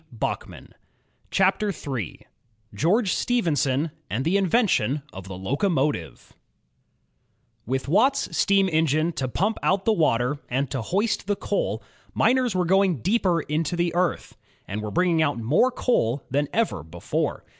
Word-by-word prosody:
DfVKNTOftS - - -3
AM) - - -15 0.6
INVENTZ0II8— 185 - -1
4 - - -33 0.5
GEORGE 185 - +2
STEPHENSON 155 - 0 0.2
AND 130 +5 -2
THE 170 +4 +2
INVENTION 185 - +2
OF 95 0 -9
THE 95 -1 -7
LOCOMOTIVE 135 - -1 1.3
With 130 +2 -2
Watt's 260 - +2
steam 195 -1 +3
engine 155 +1 +2
to 135 -5 -3
pump 200 - -1
out 190 +1 +1
the 225 - +4
water 140 - +1
and 130 +1 -1
to 130 - -2
hoist 200 - -1
the 205 - +1
coal, - - -2 0.3
miners 250 -4 +2
were 180 -1 +1
going 190 - +2
deeper 185 -4 +2
into 155 +3 -2
the 175 0 0
earth, 175 -1 -1 0.3
and 105 +2 -4
were 105 - -4
bringing 170 - +2
out 145 -5 +1
more 135 - +3
coal 140 - 0
than 145 +2 +1
ever 220 - 0
before. 80 +3 -3
165 Hz, 145 wpm, -24 LUFS, 130-195 Hz, 1.3 s, the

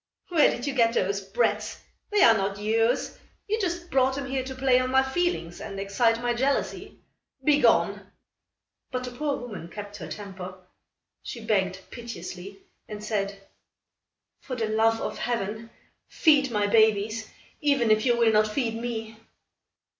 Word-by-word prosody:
"Where 330 -4 +5
did 245 - -4
you 280 - -1
get 230 -3 +3
those 200 +1 0
brats? 215 +1 -1 0.3
They 415 -2 +4
are 230 - +8
not 195 -1 -1
yours. 225 +4 0 0.3
You 435 +2 0
just 345 -2 -3
brought 265 0 +3
them 280 0 -4
here 265 -1 -2
to 265 0 -6
play 260 -1 +3
on 255 0 -1
my 265 +1 +4
feelings 265 - -2
and 195 -2 -6
excite 225 +4 +2
my 240 0 +1
jealousy. 270 +4 -1 0.5
Begone!" 290 +1 +3 0.8
But 255 0 -3
the 250 - -5
poor 285 +2 -2
woman 210 -9 -7
kept 205 +3 -8
her 160 -5 -7
temper. 190 -2 -8 0.6
She 230 -2 -8
begged 190 -3 0
piteously 195 -4 -8 0.2
and 210 -1 -7
said: 200 -2 -3 0.9
"For 255 - -6
the 225 -3 -2
love 225 +1 +3
of - - -4
Heaven, 225 -1 -3 0.4
feed 290 -4 +4
my 210 -3 +1
babies, 220 +1 +2 0.3
even 280 -7 +2
if 215 0 +4
you 240 -2 +3
will 230 -1 +4
not 215 0 +4
feed 225 +1 -1
me." 225 -1 -5
225 Hz, 155 wpm, -26 LUFS, 205-260 Hz, 0.9 s, are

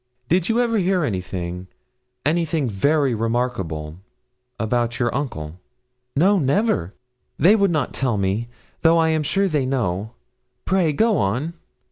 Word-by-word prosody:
Did 180 +3 +2
you 225 +1 +2
ever 230 -3 +2
hear 185 -1 +1
anything 90 -5 -4 0.6
anything 160 -2 +1
very 140 +6 +1
remarkable 110 -9 -2 0.6
about 120 +1 0
your 120 -2 0
uncle?' 90 - -4 0.6
'No, 190 +7 +4
never, 140 - 0 0.4
they 195 +6 +6
would 200 -2 +3
not 155 -6 -1
tell 125 -5 0
me, 100 +4 -1 0.3
though 165 0 +5
I 165 -1 +3
am 160 -1 +1
sure 195 +7 +1
they 150 -6 0
know. 110 -5 -2 0.5
Pray 185 -4 +2
go 220 +6 +2
on.' 125 +12 -1
135 Hz, 135 wpm, -22 LUFS, 105-170 Hz, 0.6 s, they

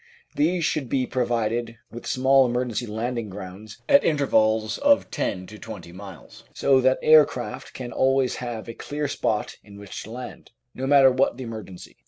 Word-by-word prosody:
These 170 +2 +1
should 140 -6 -1
be 130 0 +1
provided 120 -2 -1
with 120 - -9
small 130 0 +4
emergency 120 -1 -2
landing 115 +1 -3
grounds 95 +2 -10
at 280 -1 +6
intervals 110 -7 +1
of 285 0 +3
ten 95 -1 -2
to 105 +2 -12
twenty 110 -6 -9
miles, 95 -4 -12
so 135 -1 +3
that 130 +1 +3
air 155 -1 +8
craft 125 -3 -7
can 125 -2 -6
always 135 -1 +1
have 120 -3 -6
a 115 - -6
clear 145 +5 -4
spot 110 -5 -2
in 100 -1 -14
which 100 -1 -8
to - - -10
land, 125 0 -9 0.2
no 130 +1 -4
matter 135 -2 +6
what 130 -1 +1
the 130 - -6
emergency. 110 -6 -9
120 Hz, 175 wpm, -24 LUFS, 110-135 Hz, 0.2 s, air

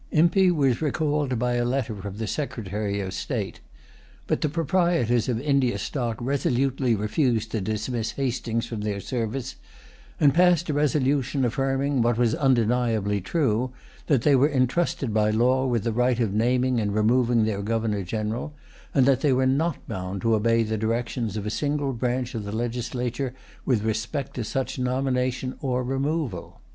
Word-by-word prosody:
Impey 175 +4 +4
was 140 -7 +2
recalled 145 -3 0
by 125 +1 0
a 120 0 +1
letter 120 -2 -1
from 100 0 -7
the 110 - -3
Secretary 105 -6 -3
of 95 -1 -4
State. 100 - -3 0.7
But - - -1
the 155 - +1
proprietors 165 - +1
of 115 -2 0
India 140 -2 +1
Stock 120 -5 -3
resolutely 130 -1 +1
refused 110 +1 0
to 110 - -1
dismiss 110 +3 -2
Hastings 120 -4 -2
from 115 -3 -5
their 105 -1 -2
service, 120 +4 -3 0.6
and 140 -2 +5
passed 175 -2 +4
a - - -2
resolution 140 -2 +1
affirming, 135 +2 0
what 120 0 +2
was 120 -2 +2
undeniably 115 -6 +1
true, 125 - 0 0.3
that 135 -6 +2
they 145 -2 +5
were 135 +3 +4
entrusted 130 -2 0
by 105 0 +3
law 125 +4 +2
with 120 -4 0
the 115 -1 -1
right 125 +1 +2
of 110 -5 0
naming 125 +3 +2
and 105 -2 -1
removing 115 +1 +3
their 105 -2 -1
Governor 110 -1 -1
General, 110 - -3 0.4
and 135 -3 +5
that 135 -1 +3
they 145 -3 +3
were 130 +1 +2
not 145 +4 0
bound 95 +1 -5
to 115 -1 +3
obey 115 +1 +3
the 110 -1 -2
directions 115 -1 -2
of 105 - -4
a 105 - -2
single 145 -1 -1
branch 125 +1 -2
of 110 -3 -4
the 100 - -5
legislature 120 +3 -3 0.3
with 115 -6 +2
respect 110 +6 -2
to 125 - -3
such 135 +4 -3
nomination 130 0 -1
or 125 -2 0
removal. 135 - -2
125 Hz, 165 wpm, -25 LUFS, 110-135 Hz, 0.7 s, and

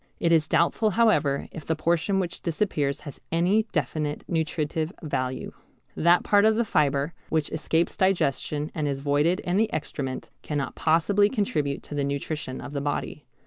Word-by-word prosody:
It 170 - +2
is 160 -2 +4
doubtful 215 +6 +2
however 180 -12 +3
if 160 - -8
the 160 - -1
portion 170 +4 +1
which 175 -2 -3
disappears 150 -5 -1
has 145 - -10
any 185 +7 +2
definite 150 0 -2
nutritive 160 -1 -1
value. 130 -4 -3 0.4
That 170 +2 +4
part 205 -1 +4
of 220 0 +5
the 235 +1 +1
fibre 150 -4 +1 0.2
which 155 -2 0
escapes 160 +2 0
digestion 150 -5 0
and 150 -2 -1
is 140 -1 -2
voided 145 +5 +2
in 180 +2 -1
the 220 0 +2
excrement 135 -3 -4
cannot 145 -3 -3
possibly 195 +6 +3
contribute 150 - -1
to - - -9
the 145 -1 0
nutrition 140 -1 -3
of 145 - -8
the 140 - -2
body. 145 +1 -3
155 Hz, 165 wpm, -26 LUFS, 145-175 Hz, 0.4 s, of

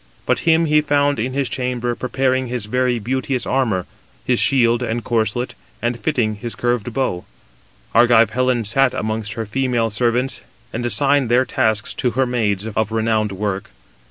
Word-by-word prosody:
But - - +2
him 165 +1 +4
he 150 -1 +4
found 145 -2 +1
in 125 +4 -2
his 140 -1 0
chamber 125 -1 -2
preparing 130 +1 0
his 120 -3 -2
very 125 +2 0
beauteous 130 +3 -2
armour, 115 -9 0 0.4
his 125 -2 +2
shield 120 -3 +3
and 120 -1 -2
corslet, 115 +2 -1 0.3
and 120 0 -2
fitting 115 -9 0
his 115 +1 -5
curved 120 -1 -1
bow. 110 -8 -1 0.7
Argive 115 -2 +5
Helen 125 0 +1
sat 130 +5 +2
amongst 110 -1 -3
her 115 - -4
female 120 0 0
servants, 120 +4 0 0.3
and 120 - -3
assigned 135 +3 +2
their 125 +2 +4
tasks 110 -7 0
to 125 - 0
her 130 - +3
maids 110 -5 -1
of 110 -1 0
renowned 110 -1 0
work. 95 0 -3
120 Hz, 160 wpm, -20 LUFS, 110-130 Hz, 0.7 s, Argive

